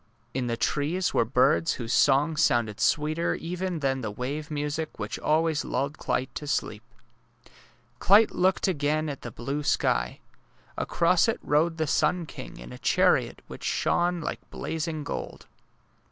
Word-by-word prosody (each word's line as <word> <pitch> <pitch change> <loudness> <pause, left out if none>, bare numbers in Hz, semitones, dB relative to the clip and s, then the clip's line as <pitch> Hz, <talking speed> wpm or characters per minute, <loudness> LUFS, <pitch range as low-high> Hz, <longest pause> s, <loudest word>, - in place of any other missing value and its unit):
In 125 -1 -1
the 115 -1 -1
trees 160 +9 0
were 115 - +3
birds 135 +7 +3
whose 120 -1 -4
songs 145 +6 +3
sounded 115 -6 +2
sweeter 155 +3 +1
even 180 -1 -4
than 135 -1 0
the 110 - -3
wave 135 +8 -4
music 150 +1 -3
which 105 +2 -4
always 155 0 +1
lulled 140 +4 -2
Clyte 130 +1 -2
to 150 - -6
sleep. 110 -6 -2 1.2
Clyte 210 +3 +6
looked 185 +2 +2
again 155 -2 0
at 140 - -6
the 120 - -6
blue 135 +6 -4
sky. 145 - 0 0.6
Across - - +2
it - - 0
rode 160 +3 +2
the 160 - 0
sun 165 +4 +1
king - - -9
in 60 +1 -10
a - - -10
chariot - - +2
which - - -10
shone 175 0 +1
like - - -4
blazing 160 -1 -4
gold. - - -6
150 Hz, 155 wpm, -27 LUFS, 130-165 Hz, 1.2 s, Clyte